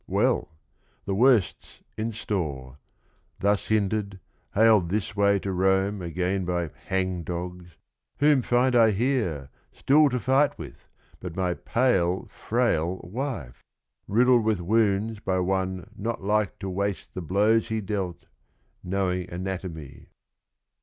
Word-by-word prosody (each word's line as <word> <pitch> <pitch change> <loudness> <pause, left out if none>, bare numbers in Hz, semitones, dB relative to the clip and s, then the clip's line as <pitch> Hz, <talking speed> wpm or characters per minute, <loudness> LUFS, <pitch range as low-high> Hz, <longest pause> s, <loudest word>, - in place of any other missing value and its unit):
"Well, - - +1 0.6
The 100 - -2
worst 115 -2 +3
's - - -19
in 110 +1 -2
store: 75 - -4 0.6
thus 100 0 +1
hindered, 100 -2 0 0.4
haled 105 -5 +5
this 105 +2 -2
way 100 0 +3
To 100 0 -3
Rome 95 +2 +1
again 90 +3 -1
by 85 -2 -2 0.2
hangdogs, 90 -2 -3 0.4
whom 145 -2 +4
find 125 +1 +2
I 115 -2 +6
Here, 100 - -1 0.2
still 150 +2 +4
to 125 -1 -1
fight 135 +4 +2
with, - - -11 0.3
but 90 -3 -7
my 90 -2 0
pale 95 -6 +1
frail 95 -7 0
wife? 105 - -5 0.2
— - - -52
Riddled 120 +2 +4
with 110 -3 +1
wounds 105 +2 +1
by 95 -3 -1
one 95 -1 -2
not 115 0 -4
like 105 0 0
to 95 -2 -5
waste 100 +1 -3
The 90 - -5
blows 105 +7 +2
he 110 -1 -2
dealt, 95 -4 -4 0.3
— - - -43
knowing 90 -1 -2
anatomy." 90 -6 -6
100 Hz, 135 wpm, -26 LUFS, 90-110 Hz, 0.6 s, I